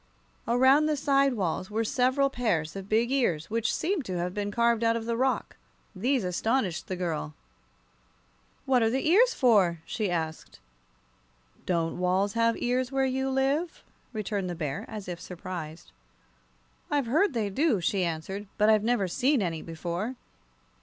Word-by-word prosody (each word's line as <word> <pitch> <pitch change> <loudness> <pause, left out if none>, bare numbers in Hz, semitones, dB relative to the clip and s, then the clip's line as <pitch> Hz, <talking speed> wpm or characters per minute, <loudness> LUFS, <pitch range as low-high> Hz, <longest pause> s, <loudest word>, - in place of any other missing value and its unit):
Around 260 +5 +5
the 305 -1 0
side 275 -2 +2
walls 185 -2 -2
were 220 +2 -1
several 260 +4 +2
pairs 180 - -1
of 195 0 -7
big 230 +3 +2
ears, 180 - 0
which 230 -1 0
seemed 360 -2 -1
to 185 -1 -3
have 175 +1 -2
been 205 0 -2
carved 235 +1 +2
out 230 0 +3
of 230 -1 -3
the 230 0 -1
rock. 260 +2 -1 0.4
These 245 +5 +1
astonished 185 +1 -1
the 185 - -3
little 180 0 -3
girl. 155 -2 -3 1.3
"What 255 -2 +3
are 225 - +3
the 265 +5 -1
ears 465 +9 +5
for?" 195 -9 +3
she 215 -4 -2
asked. 160 -2 -4 1.1
"Don't 170 -1 0
walls 185 +3 +1
have 230 0 +2
ears 250 +1 0
where 270 0 +1
you 265 +1 -1
live?" 275 +6 0 0.3
returned 205 -4 -3
the 175 - -4
Bear, 150 -4 -4
as 210 -3 -7
if 175 -2 -6
surprised. 170 -3 -7 1.0
"I've 285 -3 +1
heard 305 - +2
they 210 -3 -1
do," 270 - +2
she 185 +2 0
answered, 180 +5 -4
"but 210 +1 +4
I've 215 -1 +4
never 230 -4 +1
seen 260 - +2
any 165 -5 -2
before." 170 +8 -4
220 Hz, 165 wpm, -28 LUFS, 180-260 Hz, 1.3 s, Around